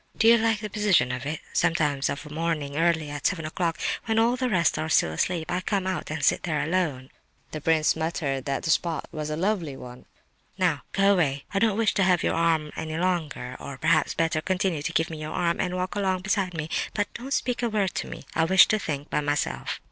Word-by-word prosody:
"Do 225 - +4
you 235 0 +7
like 225 -2 +1
the 215 - -3
position 200 - +3
of 125 +2 -4
it? 155 +1 -3
Sometimes 150 -5 +1
of 140 +2 -4
a - - -9
morning 155 -3 -2
early, 160 -2 +1
at 145 -1 0
seven 165 -5 -2
o'clock, 165 +1 -1 0.3
when 225 -1 0
all 230 +2 +4
the 255 0 -1
rest 180 -7 +2
are 160 - -2
still 80 - +3
asleep, 160 - -1
I 180 - 0
come 195 -1 -1
out 185 -1 -3
and 150 -2 -1
sit - - +3
there 155 -3 -1
alone." 155 -6 -1 0.4
The 155 - -5
prince 155 0 +3
muttered 160 -5 -2
that 140 -1 -2
the 165 - +1
spot 165 -1 0
was 155 -1 -4
a 155 - -2
lovely 170 -5 -1
one. 125 0 -11 0.5
"Now, - - +1
go 195 +1 +4
away, 140 -7 +1
I 195 - +2
don't 215 -1 +2
wish 225 -1 +2
to 195 - +2
have 180 -3 +3
your - - +1
arm 160 -2 +1
any 155 0 -4
longer; 165 -8 -2
or 140 - -7
perhaps, 160 +2 +2
better, 165 -1 +1
continue 185 -2 0
to 160 - -2
give 165 0 0
me 155 -1 -6
your 155 - -5
arm, 170 -1 0
and 180 -1 -2
walk 185 0 -2
along 190 -3 -1
beside 195 -2 0
me, 155 -1 -3 0.3
but 205 -1 -1
don't 255 +3 -7
speak 250 -3 0
a 240 - +1
word 205 -4 0
to - - -3
me. - - -9
I 160 - +2
wish 190 +1 +7
to 215 - +2
think 145 -5 -4
by - - +1
myself." 145 - -2
165 Hz, 235 wpm, -26 LUFS, 150-190 Hz, 0.5 s, you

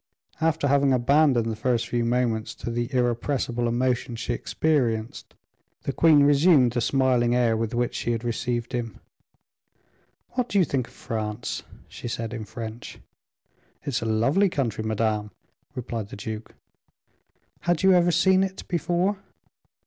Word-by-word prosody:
After 160 -2 +1
having 140 -1 +3
abandoned 130 -1 +3
the - - -3
first 115 +1 0
few 120 -1 0
moments 115 -2 0
to 120 - -5
the 120 +2 -2
irrepressible 120 -1 0
emotions 120 -1 -1
she 120 - -2
experienced, 120 -6 -1 0.5
the 140 - -2
queen 155 -2 +5
resumed 145 -3 +5
the 120 0 -1
smiling 125 -2 +2
air 120 -2 +3
with 115 +1 -2
which 120 0 0
she 120 - -2
had 115 0 -2
received 120 0 -2
him. 115 -4 -4 1.3
"What 250 -1 -2
do 205 - 0
you 185 - +5
think 130 -5 -2
of - - -19
France?" 110 +1 -4 0.3
she - - -8
said, 115 0 -4
in 110 -3 -5
French. 115 +1 -8 0.9
"It - - -4
is 130 - -1
a - - -3
lovely 135 - +2
country, 125 - -2
madame," 110 -1 -1 0.5
replied 115 -4 -4
the - - -8
duke. 110 +2 -7 1.0
"Had 175 -1 0
you 190 0 +6
ever 175 -1 +4
seen 185 +2 +4
it 190 0 -5
before?" 175 +3 0
120 Hz, 150 wpm, -25 LUFS, 115-145 Hz, 1.3 s, you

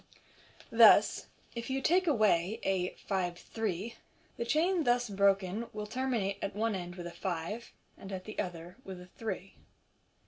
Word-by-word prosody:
Thus, - - +6 0.3
if 235 +1 -5
you 265 +1 0
take 360 +6 +3
away 215 - +3
a 185 -2 0
" - - -22
five 180 -3 -1
three," 220 +1 -4 0.4
the 235 - -3
chain 335 +6 +2
thus 245 -1 +2
broken 200 +2 +2
will 210 0 -4
terminate 225 -5 -1
at 195 - -3
one 225 +1 +1
end 175 -2 -5
with 175 -2 -7
a 175 - -5
five, 185 +6 -4 0.3
and 195 - -9
at 185 -1 -4
the 215 - -7
other 175 -1 -5
with 190 -2 -8
a 180 - -10
three. 220 +4 -6
200 Hz, 165 wpm, -32 LUFS, 180-235 Hz, 0.4 s, Thus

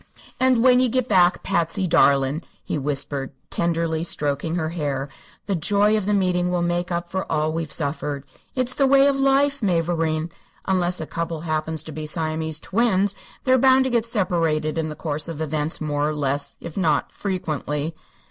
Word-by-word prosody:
"And 255 -3 +3
when 250 -1 +6
ye 255 -1 +3
get 255 +1 0
back, 180 -4 +3
Patsy 170 +3 0
darlin'," 140 -3 +3 0.2
he - - -3
whispered, 140 -1 -1 0.2
tenderly 165 -1 0
stroking 150 0 -1
her 160 -2 -1
hair, 145 -4 -3 0.4
"the 200 - -1
joy 205 +5 +3
of 210 -2 -1
the 210 - +2
meeting 180 -2 +1
will 180 -1 0
make 175 +1 -1
up 175 0 -2
for 190 +2 -4
all 155 +1 +1
that - - -5
we've 165 -3 -3
suffered. 145 -2 -3 0.3
It's 255 -1 -1
the 275 0 +2
way 275 0 +6
of 280 -1 +2
life, 275 +1 +3
mavourneen. 165 -3 0 0.3
Unless 180 -2 +1
a - - -3
couple 165 0 -4
happens 155 -1 -2
to 160 - -8
be 155 +1 -6
Siamese 160 0 -1
twins, 200 0 +1 0.3
they're 260 0 +4
bound 260 +1 +5
to 260 - -1
get 235 -1 +1
separated 165 -8 0
in 160 -1 -1
the 150 - -6
course 150 -1 -3
of 165 -3 -6
events, 155 0 -2
more 150 -1 0
or 155 - -3
less, 140 -1 -2
if 170 -2 -8
not 160 -7 +1
frequently." 155 -5 -3
165 Hz, 185 wpm, -23 LUFS, 155-200 Hz, 0.4 s, when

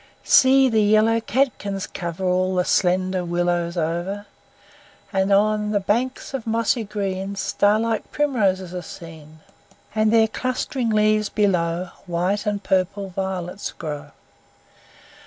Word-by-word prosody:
See, 265 0 +6
the 225 -3 +2
yellow 215 +2 +4
catkins 220 -7 -1
cover 175 +1 -5
All 185 +1 +1
the 180 -1 +1
slender 185 0 +1
willows 175 0 -1
over! 175 +5 -2 0.9
And 190 +1 +1
on 210 +1 +2
the 210 -1 +1
banks 240 +8 -2
of 255 -4 -4
mossy 230 +1 +1
green 200 -2 -3
Star 205 +1 +2
like 225 -1 -2
primroses 195 -11 0
are 180 - -4
seen; 160 -2 -12 0.5
And, 215 0 +2
their 225 -1 +5
clustering 255 +1 -2
leaves 215 -1 +2
below, 180 -3 0 0.2
White 180 +5 -1
and 205 -1 -1
purple 190 +1 0
violets 190 0 -4
grow. 150 -2 -6
200 Hz, 125 wpm, -22 LUFS, 180-215 Hz, 0.9 s, See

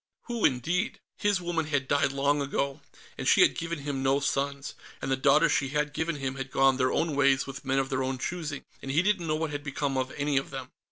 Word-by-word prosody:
Who, 235 -3 -1
indeed? 170 - 0 0.2
His 205 -3 +1
woman 170 -3 -1
had 145 -3 0
died 145 -1 +2
long 140 +1 +1
ago, 140 +1 -2 0.4
and - - -2
she - - +6
had - - +6
given 165 0 -3
him 140 -2 -3
no 135 +1 +3
sons, 140 0 -2 0.3
and 135 - -3
the - - +4
daughters 150 +5 +4
she 140 - +1
had 150 +1 -1
given 160 +2 -1
him 135 -1 -4
had 135 0 -5
gone 135 0 +3
their 130 0 +2
own 165 -3 0
ways 140 -1 +3
with 140 +1 -8
men 135 0 0
of 135 0 +1
their 135 -1 -1
own 130 0 -1
choosing 155 0 -4 0.2
and 135 - -7
he 150 +6 +3
didn't 195 -4 +1
know 155 - +1
what 160 -1 -2
had 145 0 -4
become 140 -1 -2
of 130 0 -2
any 145 -1 +1
of 135 - -1
them. 130 -2 -7
140 Hz, 240 wpm, -28 LUFS, 135-155 Hz, 0.4 s, she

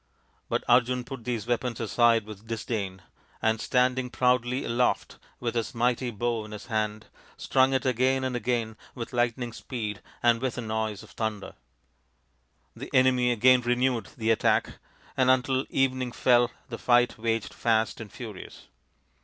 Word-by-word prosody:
But - - 0
Arjun 125 +1 +3
put 130 -2 -9
these 120 -4 -2
weapons 120 0 -1
aside 115 -1 +3
with 110 0 -11
disdain, 105 -5 -4 0.4
and 110 0 +1
stand 125 0 +2
ing 125 -1 -4
proudly 125 +1 +1
aloft 120 +1 0 0.2
with 120 -1 -2
his 115 0 -2
mighty 120 +1 +1
bow 115 0 -2
in 105 0 -10
his 105 - -8
hand, 110 -2 -2 0.3
strung 130 0 +3
it 130 0 0
again 130 +1 +2
and 130 -1 -2
again 120 -3 -1 0.2
with 120 0 -6
lightning 120 0 0
speed 110 -5 -5 0.2
and 120 -1 +4
with 130 -1 -2
a - - -2
noise 110 -2 -3
of - - -15
thunder. 110 -3 -4 1.2
The - - -8
enemy 130 -1 +4
again 125 +2 +5
re 120 0 +1
newed 125 -3 0
the 115 -1 +1
attack, 110 - +1 0.4
and 130 -1 +3
until 130 +1 +2
evening 130 -2 0
fell 120 -2 +4 0.2
the 115 - -6
fight 120 -1 +3
waged 115 -1 -1
fast 115 -1 0
and 110 - -9
furious. 110 -6 -10
120 Hz, 160 wpm, -27 LUFS, 110-125 Hz, 1.2 s, again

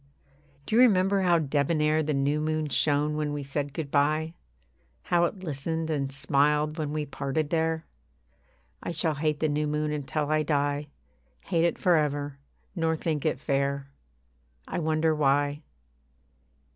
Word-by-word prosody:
Do 215 - -1
you 240 - +7
remember 195 -4 +4
how 175 -2 +4
debonair 150 +1 +1
The 155 -1 -1
new 140 +2 +1
moon 155 0 -1
shone 145 +2 +1
when 150 -1 -1
we 145 -1 -3
said 140 +1 -3
good 145 -1 -5
bye? 155 +3 +1 0.7
How 175 -1 +2
it 190 +2 -5
listened 160 +1 -2
and 140 -3 -1
smiled 150 +3 +1
when 150 -2 -2
we 150 0 -2
parted 145 +1 -3
there? 160 -1 0 1.0
I 170 - -4
shall 160 -1 +1
hate 150 0 -1
the 155 - +3
new 150 0 0
moon 150 0 -1
until 150 0 -2
I 155 0 +3
die 145 -1 0 0.5
Hate 170 -3 +1
it 170 - 0
for 180 -4 +3
ever, 145 -2 -1 0.4
nor 165 -2 0
think 155 -2 -1
it 155 - -1
fair. 140 -1 -1 0.8
I - - -3
wonder 160 0 +1
why. 145 0 +1
150 Hz, 155 wpm, -27 LUFS, 145-160 Hz, 1.0 s, you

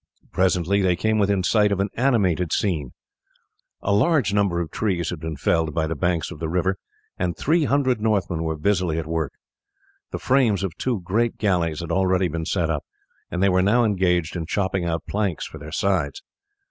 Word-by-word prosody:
Presently 95 +1 +2
they 90 -2 +2
came 110 +4 +1
within 100 -2 +2
sight 105 +2 +3
of 100 - 0
an 100 +1 0
animated 100 - +1
scene. 80 - -1 0.9
A 100 - +1
large 120 - +2
number 100 -4 +2
of 85 -3 -4
trees 95 -6 -1
had 90 - -5
been 80 0 -5
felled 80 +2 0
by 80 -1 +1
the 80 - -2
banks 85 +3 -1
of 85 - -9
the 80 -1 -3
river 95 +3 0 0.4
and 90 -2 -1
three 160 +1 +2
hundred 130 -5 +1
Northmen 100 -6 0
were 80 -1 -1
busily 90 0 0
at 80 - -2
work. 80 -3 -2 0.8
The - - -4
frames 120 -7 +2
of 95 -4 -3
two 120 -7 -1
great 110 +7 0
galleys 90 -6 0
had 85 - -5
already 95 -1 +2
been 80 +1 -3
set 85 -1 0
up, 75 -3 -2 0.5
and 90 +1 -1
they 100 - +5
were 95 0 +3
now 110 +6 +3
engaged 90 -6 +1
in 80 -2 -4
chopping 95 -2 -1
out 80 -1 -2
planks 100 -5 -1
for - - -9
their 75 +2 -9
sides. 85 -5 -1
90 Hz, 195 wpm, -23 LUFS, 85-100 Hz, 0.9 s, they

